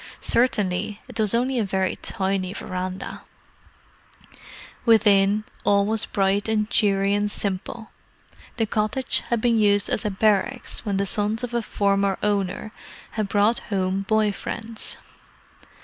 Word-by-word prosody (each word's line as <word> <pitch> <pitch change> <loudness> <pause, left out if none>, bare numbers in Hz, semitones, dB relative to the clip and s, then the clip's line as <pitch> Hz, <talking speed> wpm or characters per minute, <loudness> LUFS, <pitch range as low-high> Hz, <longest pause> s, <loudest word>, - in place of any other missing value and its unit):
Certainly 210 -4 0
it - - -7
was 215 0 +3
only 250 +1 +1
a - - +2
very 190 -1 -1
tiny 190 -1 -1
verandah. 185 -2 -5 1.6
Within, 210 -2 +4 0.2
all 200 -1 +3
was 220 +1 0
bright 200 +1 +1
and 215 -1 +1
cheery 200 -2 +2
and 205 0 +1
simple. 205 +3 -4 0.7
The 225 - +2
cottage 215 +4 +1
had 235 -2 +1
been 235 -1 +3
used 205 -1 +3
as - - 0
a 210 - 0
"barracks" 215 +5 0
when 200 -4 -1
the 200 - +1
sons 210 +4 -1
of 245 -1 -4
a 235 - +1
former 200 -2 +1
owner 205 0 -1 0.4
had 215 -2 -2
brought 210 +3 +3
home 190 -1 0
boy 215 +1 +2
friends. 225 +2 -5
205 Hz, 135 wpm, -24 LUFS, 195-220 Hz, 1.6 s, Within